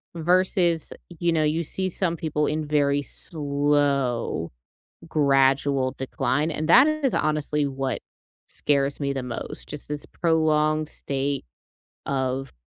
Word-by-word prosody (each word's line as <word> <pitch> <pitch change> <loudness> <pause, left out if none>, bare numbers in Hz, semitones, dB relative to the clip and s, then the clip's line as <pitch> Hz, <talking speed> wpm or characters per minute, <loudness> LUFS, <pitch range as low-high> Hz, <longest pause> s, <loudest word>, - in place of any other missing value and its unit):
Versus, 175 0 +2 0.3
you 175 0 +2
know, 160 -2 +2
you 155 +2 +1
see 190 +4 -2
some 170 -1 -1
people 150 -1 -1
in 155 +1 -1
very 145 -1 +2
slow 140 - -1 0.6
gradual 135 -2 +2
decline, 135 +3 -1
and 155 0 -3
that 260 - +8
is 310 -4 0
honestly 150 -1 0
what 135 -1 -2 0.5
scares 140 -1 0
me 140 -1 -1
the 135 - -3
most. 125 -2 -6
Just 150 -1 -6
this 150 0 -4
prolonged 155 -2 +1
state 140 -1 -3 0.6
of 130 0 -2
150 Hz, 125 wpm, -25 LUFS, 140-160 Hz, 0.6 s, that